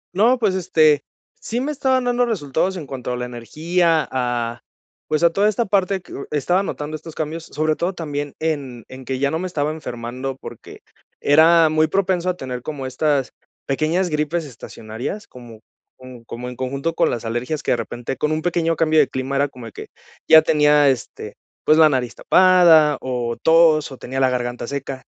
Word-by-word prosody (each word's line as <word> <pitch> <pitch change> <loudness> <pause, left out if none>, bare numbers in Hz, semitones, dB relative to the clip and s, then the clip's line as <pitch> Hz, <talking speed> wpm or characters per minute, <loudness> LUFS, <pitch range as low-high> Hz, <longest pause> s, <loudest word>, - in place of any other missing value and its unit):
No, 235 +6 +4
pues 210 -5 +1
este 155 -5 +3 0.4
sí 235 +2 -3
me 285 +4 -2
estaban 260 -3 +1
dando 245 0 +1
resultados 185 - -1
en 155 - -6
cuanto 130 -2 -6
a 125 - -1
la 125 - -3
energía 160 +7 0
a, 120 -2 -2 0.5
pues 155 +1 0
a 170 - +5
toda 205 +4 +2
esta 225 +3 -1
parte 195 -1 0
que - - -14
u - - -7
estaba 165 +6 +1
notando 155 -5 -5
estos 160 +1 -10
cambios, 160 +1 -4
sobre 155 +1 -1
todo 180 +4 -2
también 145 -4 -5
en 140 -7 -3
en 130 0 -11
que 130 - -3
ya 140 +2 0
no 160 - -1
me 185 - -3
estaba 150 -4 -2
enfermando 130 -2 -6
porque - - -11 0.4
era 160 +3 +5
muy 155 0 +2
propenso 185 -2 0
a 180 - -2
tener 125 -2 -6
como 140 -1 -6
estas 135 +1 0 0.3
pequeñas 160 +6 0
gripes 155 +2 -1
estacionarias, 125 - -7
como 120 -3 -13 0.4
como 130 -2 -12
como 120 +2 -7
en 125 - -7
conjunto 140 +5 -3
con - - +2
las 120 -1 -4
alergias 125 +7 -3
que - - 0
de 120 - +2
repente 120 +3 -5
con 150 +5 -1
un 155 0 -2
pequeño 165 -2 0
cambio 155 0 +2
de 145 - +4
clima 130 +1 -4
era 140 +1 +2
como 125 -4 -12
de 115 - -9
que - - -9 0.4
ya 160 0 +8
tenía, 150 -2 +4
este, 130 -3 -4 0.3
pues 155 +1 +5
la 155 -1 +7
nariz 125 -4 -1
tapada, 175 -5 +5
o 120 -2 -3
tos, 160 -3 +4
o 135 - -9
tenía 130 +2 -5
la 130 -1 +3
garganta 120 -1 -3
seca. 135 -1 -5
150 Hz, 195 wpm, -20 LUFS, 130-170 Hz, 0.5 s, ya